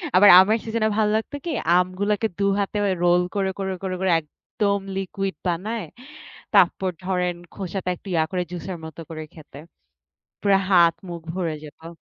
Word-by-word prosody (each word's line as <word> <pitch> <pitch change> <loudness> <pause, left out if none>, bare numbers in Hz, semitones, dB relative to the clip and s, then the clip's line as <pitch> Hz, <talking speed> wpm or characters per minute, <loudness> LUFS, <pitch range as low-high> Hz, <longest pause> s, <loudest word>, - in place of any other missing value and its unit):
আবার 205 +2 +8
আমার 215 +4 +3
সিজনে 220 -1 0
ভালো 215 -1 +3
লাগতো 250 +6 -5
কি? 335 - -2 0.3
আমগুলাকে 200 +4 0
২ - - +1 0.2
হাতে 200 +1 -2 0.3
রোল 175 0 +5
করে, 195 -1 +1
করে, 190 -1 -2
করে, 185 -1 -2
করে 190 -2 +2
একদম 200 +6 -2 0.2
লিকুইড 195 0 -3
বানায়, 205 +6 -2 0.7
তারপর 190 -1 +4 0.2
ধরেন 180 -2 0 0.2
খোসাটা 190 -1 -4
একটু 195 - -17
ইয়া 160 -1 +2
করে 180 -1 -1
জুসের 180 0 -5
মত 160 -1 -10
করে 155 -1 -6
খেতে। 145 -3 -12 0.8
পুরা 200 -1 +4
হাত 170 -2 +6 0.2
মুখ 170 -1 -6
ভরে 170 -4 -2
যেত। 165 +3 -11
190 Hz, 160 wpm, -23 LUFS, 175-200 Hz, 0.8 s, আবার